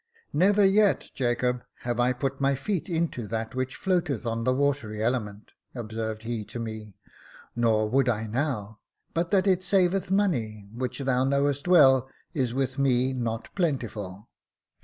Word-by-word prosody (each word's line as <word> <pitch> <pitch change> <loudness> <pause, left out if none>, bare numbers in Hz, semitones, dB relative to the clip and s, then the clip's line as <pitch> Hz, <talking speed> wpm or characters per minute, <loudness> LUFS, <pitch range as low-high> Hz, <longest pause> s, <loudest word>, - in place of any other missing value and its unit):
" 460 - -35
Never 200 +5 +4
yet, 200 +1 +3
Jacob, 125 -1 0 0.2
have 120 0 -2
I 125 +1 +4
put 135 +2 -3
my 140 0 +3
feet 190 +7 -3
into 160 -9 -1
that 110 +1 -3
■which 130 0 -3
floateth 175 - 0
on 115 0 -2
the 130 - +3
watery 135 -6 0
element," 110 -4 -2 0.2
observed 110 -2 -4
he 115 -1 -3
to - - -8
me; 110 -3 -6 0.6
"nor 110 -2 +2
would 130 +3 +2
I 110 -1 0
now, 110 -3 -2 0.3
but 170 +1 0
that 190 0 +3
it 185 -2 +3
saveth 185 0 +2
money, 120 - 0
which 125 +1 -3
thou 130 -2 +1
knowest 140 +2 +1
well 135 -7 +6 0.2
is 130 -5 0
with 130 +1 -2
me 130 -1 +2
not 115 -3 -3
plentiful. 115 - -3
130 Hz, 160 wpm, -27 LUFS, 115-150 Hz, 0.6 s, well